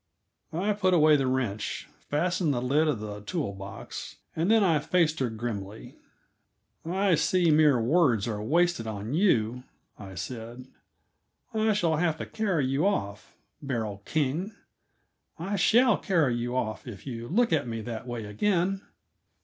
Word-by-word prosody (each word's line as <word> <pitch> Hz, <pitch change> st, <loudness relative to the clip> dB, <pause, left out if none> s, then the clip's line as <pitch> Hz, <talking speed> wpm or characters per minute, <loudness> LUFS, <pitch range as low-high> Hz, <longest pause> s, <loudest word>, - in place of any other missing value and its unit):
I 195 Hz, +6 st, 0 dB
put 185 Hz, -3 st, +2 dB
away 155 Hz, -2 st, +6 dB
the 135 Hz, -2 st, +1 dB
wrench, 120 Hz, -6 st, -2 dB, 0.2 s
fastened 175 Hz, -1 st, +1 dB
the -, -, 0 dB
lid 140 Hz, +6 st, +2 dB
of 145 Hz, -8 st, 0 dB
the 105 Hz, -1 st, -6 dB
tool 140 Hz, -, -3 dB
box, 100 Hz, 0 st, -8 dB, 0.2 s
and 165 Hz, +4 st, 0 dB
then 225 Hz, -1 st, +5 dB
I 165 Hz, -5 st, +3 dB
faced 160 Hz, +1 st, +1 dB
her 130 Hz, -3 st, 0 dB
grimly. 110 Hz, -2 st, -6 dB, 0.9 s
"I 190 Hz, +3 st, +1 dB
see 165 Hz, +2 st, +3 dB
mere 150 Hz, -4 st, +5 dB
words 120 Hz, -, +2 dB
are 105 Hz, -2 st, -3 dB
wasted 165 Hz, 0 st, +1 dB
on 110 Hz, +3 st, -4 dB
you," 125 Hz, -, +2 dB, 0.4 s
I 95 Hz, -2 st, -9 dB
said. 120 Hz, +6 st, -7 dB, 0.9 s
"I 220 Hz, 0 st, +2 dB
shall 170 Hz, -6 st, +1 dB
have 160 Hz, -1 st, +1 dB
to -, -, -5 dB
carry 190 Hz, -10 st, 0 dB
you 135 Hz, +8 st, +1 dB
off 105 Hz, -, -3 dB, 0.3 s
Beryl 110 Hz, -8 st, -3 dB
King; 160 Hz, -, -1 dB, 0.8 s
I 190 Hz, +5 st, -3 dB
shall 230 Hz, +4 st, +4 dB
carry 165 Hz, -10 st, +2 dB
you 120 Hz, +1 st, -3 dB
off 110 Hz, -1 st, -3 dB
if 105 Hz, -6 st, -9 dB
you 120 Hz, -3 st, -6 dB
look 230 Hz, -, +2 dB
at 150 Hz, -5 st, +1 dB
me 115 Hz, -1 st, -4 dB
that 115 Hz, +1 st, -6 dB
way 120 Hz, -3 st, -4 dB
again!" 185 Hz, -, 0 dB
145 Hz, 155 wpm, -28 LUFS, 115-175 Hz, 0.9 s, away